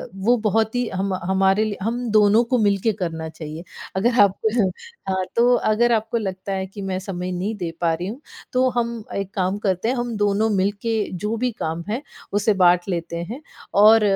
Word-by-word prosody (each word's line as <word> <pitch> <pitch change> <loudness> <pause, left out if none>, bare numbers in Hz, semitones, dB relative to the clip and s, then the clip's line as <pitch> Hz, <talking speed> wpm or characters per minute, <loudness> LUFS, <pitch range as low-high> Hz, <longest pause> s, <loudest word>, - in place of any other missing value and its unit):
वो 215 +6 +3
बहुत 220 +2 +1
ही 245 -1 0
हम 190 +1 -1
हमारे 190 +2 +3
लिए 215 -2 -2
हम 240 +2 -2
दोनों 215 +1 +5
को 245 +1 0
मिल 205 -2 +3
के 225 - +2
करना 165 -3 -3
चाहिए। 155 +1 -8 0.3
अगर 230 +5 +2
आप 195 -1 +4
अ, 220 -4 +2 0.4
हाँ, 190 0 0
तो 240 +1 +5
अगर 240 +2 +2
आपको 225 +1 +1
लगता 195 -2 -4
है 190 0 -2
कि 195 +2 -9
मैं 190 -1 -2
समय 185 -1 -4
नहीं 190 +5 -2
दे 175 -4 -3
पा 165 -1 +2
रही 175 +3 -3
हूँ 235 +8 -6 0.3
तो 255 +1 +3
हम 235 -2 -1
एक 195 -1 -4
काम 190 +1 0
करते 195 0 0
हैं 255 - +1
हम 240 -2 -2
दोनों 205 +1 +2
मिल 195 -1 +2
के 230 -1 -1 0.2
जो 210 +5 -2
भी 250 +2 0
काम 170 -7 -4
है, 230 +6 -1 0.3
उसे 205 +1 +3
बाँट 180 -2 +4
लेते 170 -2 -3
हैं 260 +5 -6 0.4
और 220 +1 +8
205 Hz, 210 wpm, -22 LUFS, 185-225 Hz, 0.4 s, और